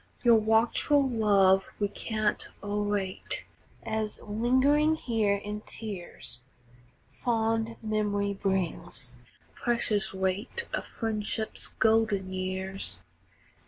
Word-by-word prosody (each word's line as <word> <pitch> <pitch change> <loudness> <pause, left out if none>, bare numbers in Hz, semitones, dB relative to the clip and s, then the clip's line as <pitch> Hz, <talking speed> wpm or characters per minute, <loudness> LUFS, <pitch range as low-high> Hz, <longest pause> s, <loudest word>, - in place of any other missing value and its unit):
Your 240 -2 +7
watchful 225 +6 +3
love 200 -5 +3
we 205 - +2
can't 215 +1 -1 0.2
o'errate, 205 -2 -1 0.4
As, 220 -1 -2
lingering 260 +8 +3
here 225 -8 +1
in 210 +1 -5
tears, 190 - -5 0.6
Fond 225 -1 -1
memory 205 -2 0
brings 170 -11 -2 0.3
the - - -32
precious 230 -4 +1
weight 190 - -2
Of - - -2
friendship's 220 -1 -2
golden 215 -4 +2
years. 190 +1 -1
210 Hz, 90 wpm, -29 LUFS, 195-225 Hz, 0.6 s, Your